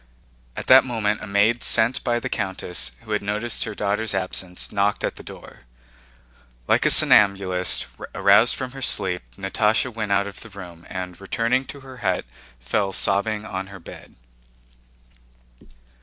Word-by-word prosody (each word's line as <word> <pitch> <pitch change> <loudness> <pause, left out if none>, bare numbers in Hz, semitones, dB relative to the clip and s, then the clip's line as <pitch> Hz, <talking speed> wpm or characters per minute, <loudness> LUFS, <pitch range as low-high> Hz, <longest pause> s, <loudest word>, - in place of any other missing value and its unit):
At - - -6
that 130 0 +8
moment 110 -4 -2
a - - -7
maid 105 +4 +2
sent 115 +2 +3
by 120 -2 0
the - - -4
countess, 90 - -2
who 110 - -11
had 105 - 0
noticed 105 +4 -2
her 110 -2 -6
daughter's 105 +1 -1
absence, 95 -1 -2
knocked 100 0 0
at - - -2
the - - -11
door. - - -13 1.0
Like - - +3
a - - +4
somnambulist 95 -3 +4 0.3
aroused 100 +4 +4
from 130 -1 -5
her 135 0 -10
sleep 95 -7 -1 0.2
Natásha 105 +5 0
went 110 -2 -4
out 100 0 +2
of 100 - -9
the 115 - -11
room 90 -4 -12
and, 90 0 -7
returning 115 +6 0
to 140 +1 -10
her 130 -1 -12
hut, 95 -6 -1 0.3
fell 95 - -1
sobbing 105 +3 +1
on 95 0 -5
her 100 0 -11
bed. 85 - -13
100 Hz, 155 wpm, -22 LUFS, 95-115 Hz, 1.0 s, that